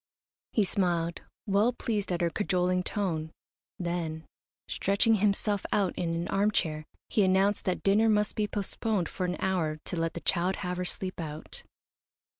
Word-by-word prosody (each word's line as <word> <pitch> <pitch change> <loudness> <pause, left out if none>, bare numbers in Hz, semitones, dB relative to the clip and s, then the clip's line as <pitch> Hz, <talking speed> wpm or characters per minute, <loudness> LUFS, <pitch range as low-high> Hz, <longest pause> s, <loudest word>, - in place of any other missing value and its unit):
He 215 - +3
smiled, 170 -3 0 0.2
well 205 +4 +3
pleased 210 -5 -2
at 175 0 0
her 170 -1 +2
cajoling 180 -2 +1
tone, 170 -5 -2 0.5
then, 170 -3 -3 0.4
stretching 200 +4 +2
himself 205 -1 +1
out 195 -4 +2
in 165 -1 -1
an 170 +1 -2
armchair, 170 -7 +1 0.2
he 215 - +2
announced 195 +2 +3
that 185 - -1
dinner 210 +3 +4
must 210 -1 +2
be 210 -1 +1
postponed 205 -1 -1
for 185 - -3
an 180 - -2
hour 175 -5 0
to - - -3
let 165 0 -1
the 170 - -4
child 180 +1 +1
have 180 0 -2
her 180 - -2
sleep 185 +1 -4
out. 155 -2 -7
185 Hz, 160 wpm, -29 LUFS, 170-205 Hz, 0.5 s, dinner